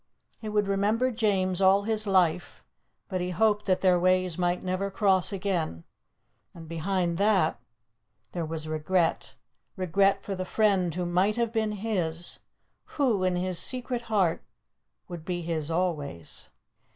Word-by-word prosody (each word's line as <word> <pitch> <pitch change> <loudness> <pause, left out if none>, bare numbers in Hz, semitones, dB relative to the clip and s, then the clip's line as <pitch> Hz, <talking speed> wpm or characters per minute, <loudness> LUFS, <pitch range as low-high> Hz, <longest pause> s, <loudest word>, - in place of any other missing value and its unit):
He 215 - -6
would 210 -1 +1
remember 210 +6 +1
James 195 -5 0
all 195 +1 +5
his 215 0 -1
life, 180 -3 +1 0.4
but 185 -3 -3
he 180 - -2
hoped 210 +2 +1
that 185 -1 +2
their 180 -2 +4
ways 185 -1 +2
might 175 0 0
never 185 +2 -1
cross 195 -1 +2
again. 180 - -2 0.7
And, 165 -2 -10
behind 170 +1 -1
that, 200 -6 +2 0.7
there 170 - -3
was 160 -1 -4
regret; 160 +2 0 0.4
regret 195 +1 +2
for 200 - -4
the 185 -1 -3
friend 190 -3 +2
who 180 0 -2
might 185 +5 +1
have 235 -1 0
been 220 -2 0
his, 180 -6 -2 0.6
who, 240 -10 +2
in 185 -1 +1
his 180 0 0
secret 250 -1 0
heart, 190 -7 +1 0.6
would 175 -3 -8
be 175 0 -3
his 160 -2 -2
always. 155 - -3
185 Hz, 145 wpm, -27 LUFS, 175-205 Hz, 0.7 s, all